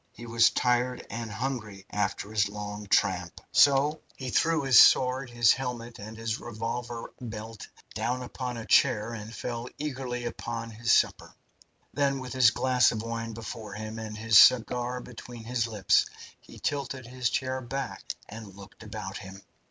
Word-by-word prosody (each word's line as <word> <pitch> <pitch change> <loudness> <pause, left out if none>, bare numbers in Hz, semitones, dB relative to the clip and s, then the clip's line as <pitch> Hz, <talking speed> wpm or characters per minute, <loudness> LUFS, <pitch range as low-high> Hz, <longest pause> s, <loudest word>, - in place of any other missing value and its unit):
He 120 - -10
was 115 0 +4
tired 125 0 0
and 115 -1 -4
hungry 105 -4 -4
after 100 0 -2
his 100 -2 +2
long 105 0 -6
tramp, 90 -3 +1
so 145 +2 +4
he 130 -2 -5
threw 165 +2 +2
his 135 -2 +7
sword, 130 0 +5
his 120 -1 +5
helmet, 120 -2 -5
and 110 +2 -9
his 115 -1 -2
revolver 120 +1 -5
belt 110 -2 -7 0.3
down 120 +4 -2
upon 125 0 -5
a 115 - -6
chair, 115 -4 +3
and 110 -1 -7
fell 120 +1 -5
to - - -13
eagerly 130 -4 -4
upon 115 -1 -5
his 115 0 -1
supper. - - +2 0.6
Then, 140 -1 +1
with 130 -2 -6
his 130 -3 +6
glass 125 +2 +3
of 110 -1 -4
wine 115 0 -4
before 110 -1 -7
him 110 +1 -6
and 110 -1 -6
his 110 -2 +6
cigar 125 0 +4
between 120 -1 -10
his 115 0 -1
lips, 105 -4 +3 0.3
he - - -15
tilted 135 -3 -3
his 125 0 -2
chair 130 0 -2
back 130 +1 -5
and 105 -3 -10
looked 100 +2 -14
about 105 -2 -6
him. 95 -1 -11
115 Hz, 165 wpm, -28 LUFS, 110-125 Hz, 0.6 s, his